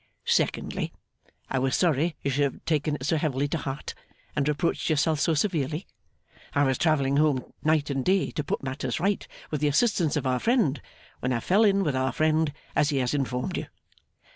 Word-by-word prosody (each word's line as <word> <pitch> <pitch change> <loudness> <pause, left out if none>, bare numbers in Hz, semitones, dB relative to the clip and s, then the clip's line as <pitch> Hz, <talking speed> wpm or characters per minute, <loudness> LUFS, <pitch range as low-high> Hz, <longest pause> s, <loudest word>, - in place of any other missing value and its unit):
Secondly. - - 0 0.6
I 135 - -1
was 130 0 +1
sorry 165 -1 +2
you 140 - 0
should 140 +1 +2
have - - -18
taken 155 -1 +1
it 130 - -6
so 160 +2 +2
heavily 145 -2 0
to 165 - -1
heart, 135 0 -5 0.4
and 140 -1 +1
reproached 150 +4 0
yourself 155 0 +2
so 160 +2 +2
severely; 155 -1 -1 0.7
I 145 - +4
was 130 -2 +1
travelling 140 -4 +2
home 145 -4 +1
night 155 -2 +2
and 135 -1 -1
day 190 +4 +2
to 150 - -3
put 140 - -3
matters 130 -1 -3
right, 200 +2 0 0.2
with 150 -2 -2
the 150 - +3
assistance 165 -1 +2
of 145 - -2
our 130 -1 +1
friend, 210 - +2 0.4
when 125 - -1
I 120 - +1
fell 195 - +3
in 200 -2 +4
with 150 -6 0
our 130 -1 0
friend 155 +1 +2 0.2
as 150 - +3
he 145 - 0
has 125 0 0
informed 125 -3 -1
you. - - -4
150 Hz, 195 wpm, -27 LUFS, 135-160 Hz, 0.7 s, I